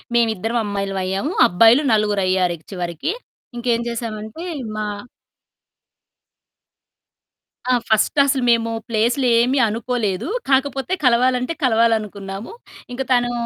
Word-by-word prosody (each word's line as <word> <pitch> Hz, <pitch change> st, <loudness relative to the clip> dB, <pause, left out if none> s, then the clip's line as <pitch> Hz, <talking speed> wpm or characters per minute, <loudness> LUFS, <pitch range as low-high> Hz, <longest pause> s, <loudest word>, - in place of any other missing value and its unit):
మేమిద్దరం 225 Hz, 0 st, +1 dB
అమ్మాయిలమయ్యాం. 195 Hz, +2 st, -2 dB, 0.2 s
అబ్బాయిలు 230 Hz, +8 st, +5 dB
నలుగురయ్యారు 190 Hz, -4 st, +1 dB
ఇక 155 Hz, -, -27 dB
చివరికి. 175 Hz, -, -3 dB, 0.5 s
ఇంకేం 235 Hz, -1 st, 0 dB
జేశామంటే, 230 Hz, +5 st, -5 dB, 0.3 s
మా 215 Hz, -, -2 dB, 2.9 s
ఆ! -, -, +4 dB, 0.2 s
ఫస్ట్ 220 Hz, +6 st, +2 dB
అసలు 270 Hz, -2 st, 0 dB
మేము 230 Hz, -1 st, +2 dB, 0.2 s
ప్లేసు‌లేమీ 240 Hz, +3 st, +2 dB
అనుకోలేదు. 225 Hz, -2 st, -2 dB, 0.2 s
కాకపోతే, 270 Hz, +4 st, +1 dB
కలవాలంటే 250 Hz, +3 st, +2 dB
కలవాలనుకున్నాము. 220 Hz, -4 st, 0 dB, 0.4 s
ఇంక 245 Hz, -, -4 dB
తనూ 245 Hz, -1 st, +2 dB
230 Hz, 90 wpm, -20 LUFS, 205-245 Hz, 2.9 s, అబ్బాయిలు